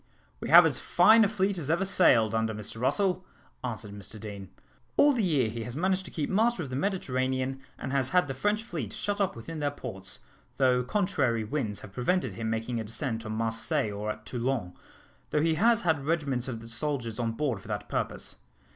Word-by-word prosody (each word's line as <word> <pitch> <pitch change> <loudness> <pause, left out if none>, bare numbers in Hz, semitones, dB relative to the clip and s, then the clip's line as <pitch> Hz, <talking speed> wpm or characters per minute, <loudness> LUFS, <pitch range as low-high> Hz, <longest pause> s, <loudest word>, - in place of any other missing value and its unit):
"We - - -5
have - - +10
as - - +2
fine 225 +1 +6
a - - +4
fleet 200 -2 0
as 150 -3 -3
ever 170 +4 +2
sailed, 120 - +5
under 110 -1 0
Mr 105 +2 -6
Russell," 185 +6 +1 0.4
answered 110 -4 -4
Mr 100 +1 -8
Deane. 100 -3 -8 0.5
"All 290 0 +6
the 245 - +1
year 150 - +2
he 115 +1 -4
has 120 +2 -6
managed 190 +4 0
to - - -6
keep 150 -3 -2
master 220 -1 +2
of 135 - -7
the - - -2
Mediterranean, 130 -6 -1 0.2
and 130 - -5
has 135 -2 +1
had 180 -4 +3
the 135 - -3
French 205 - 0
fleet 150 - -5
shut 205 0 -2
up 195 - 0
within 155 +8 -7
their 145 -1 +1
ports, 95 -9 -6 0.4
though 130 -2 +4
contrary 135 - 0
winds 110 -3 -2
have 100 - -11
prevented 180 - 0
him 115 -1 -3
making 115 +1 -2
a - - -2
descent 115 0 -3
on 110 - -3
Marseilles 115 -1 0
or 105 +1 -4
at 105 0 -5
Toulon, 120 -7 -2 0.6
though 150 - +1
he 165 0 +3
has 230 +7 +3
had 160 -5 +1
regiments 140 -5 0
of 115 -3 -6
soldiers 115 -1 -2
on 115 -2 -1
board 125 -5 -1
for - - -14
that 105 -1 -4
purpose. - - -3
130 Hz, 205 wpm, -28 LUFS, 110-175 Hz, 0.6 s, have